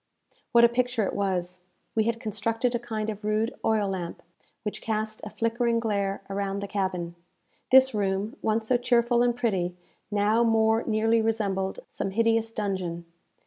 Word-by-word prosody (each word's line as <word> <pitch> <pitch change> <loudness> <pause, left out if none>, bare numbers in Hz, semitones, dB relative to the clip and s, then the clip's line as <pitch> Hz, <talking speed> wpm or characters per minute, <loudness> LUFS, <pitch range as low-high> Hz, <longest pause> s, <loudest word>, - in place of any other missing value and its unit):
What 235 0 +6
a - - +9
picture 245 -1 0
it - - -3
was! 180 -2 -2 0.3
We 220 -1 +2
had 230 0 0
constructed 230 +2 -1
a 240 - 0
kind 220 -3 -4
of 210 0 -9
rude 215 +3 0
oil 215 -2 +2
lamp, 180 -3 -5 0.4
which 210 - -4
cast 215 -1 -2
a 210 - -5
flickering 230 +1 0
glare 200 -3 -1
around 195 0 -2
the - - -4
cabin. 185 -4 -2 0.6
This 265 0 +7
room, 200 +3 -1
once 220 0 0
so 245 +2 +3
cheerful 240 -1 +2
and 240 -1 +2
pretty, 190 -7 -1 0.3
now 210 +2 +2
more 225 0 +3
nearly 225 +1 +2
resembled 200 -4 -1
some - - -4
hideous 225 +2 +2
dungeon. 190 -6 -3
220 Hz, 160 wpm, -27 LUFS, 195-230 Hz, 0.6 s, a